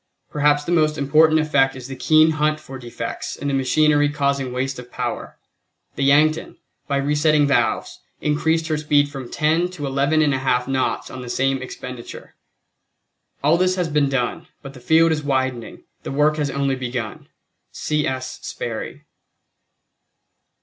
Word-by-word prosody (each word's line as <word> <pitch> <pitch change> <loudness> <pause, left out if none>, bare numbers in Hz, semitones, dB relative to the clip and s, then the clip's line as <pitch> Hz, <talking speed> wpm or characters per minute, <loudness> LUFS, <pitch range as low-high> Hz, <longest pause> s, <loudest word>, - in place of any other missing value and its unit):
Perhaps 145 0 +2
the 170 - -4
most 155 -2 +2
important 155 +3 +4
effect 140 -4 +2
is 130 -1 -8
the 135 - -7
keen 155 +3 +4
hunt 155 0 0
for 135 -3 -10
defects 120 -1 -6
in 140 - -5
the - - -1
machinery 145 +2 +3
causing 140 -3 -1
waste 130 +1 -3
of 125 0 -11
power. - - -5 0.6
The 140 - -3
Yankton 155 +3 +2 0.3
by 140 - 0
resetting 150 +1 +2
valves 140 - 0 0.2
increased 160 +2 0
her 155 - +1
speed 145 -1 +2
from 135 -4 -8
10 160 +4 +1
to 170 -6 -6
11 140 +3 +1
1/2 130 -4 +1
knots 130 -1 -1
on 130 - -7
the 125 - -8
same 135 +1 0
expenditure. 125 -1 -9 1.1
All 155 +4 +4
this 185 +1 +2
has 180 -3 -1
been 145 -2 +2
done, 130 -3 -2 0.2
but 135 -1 -9
the 130 - -12
field 160 +6 +4
is 155 -1 0
widening, 130 -4 -2 0.2
the - - -6
work 150 +2 +2
has 145 -2 -1
only 140 0 0
begun. 125 -4 -5 0.4
C. 150 -1 -1
S. 130 0 -4
SPERRY. - - -6
145 Hz, 155 wpm, -21 LUFS, 135-155 Hz, 1.1 s, important